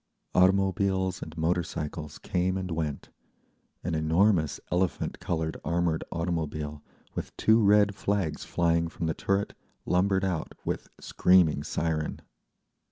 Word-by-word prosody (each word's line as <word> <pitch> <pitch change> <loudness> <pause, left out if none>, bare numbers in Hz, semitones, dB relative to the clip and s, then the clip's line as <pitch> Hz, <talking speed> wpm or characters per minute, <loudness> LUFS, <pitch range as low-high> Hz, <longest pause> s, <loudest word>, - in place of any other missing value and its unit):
Automobiles 95 0 +2
and 80 +1 -8
motorcycles 80 -3 -2
came 90 +1 -1
and 95 -1 -4
went; 80 -3 -3 0.7
an 85 - -2
enormous 80 -1 +2
elephant 90 0 0
coloured 80 -3 -2
armoured 85 0 0
automobile, 80 -3 -3 0.3
with - - -6
two 110 +1 +4
red 105 0 +5
flags 100 -4 -1
flying 85 -1 +1
from 85 - -5
the 80 - 0
turret, 100 +4 -1 0.3
lumbered 95 +1 +2
out 90 -4 -2
with - - -3
screaming 90 -6 +3
siren. 80 +1 -2
85 Hz, 115 wpm, -28 LUFS, 80-95 Hz, 0.7 s, red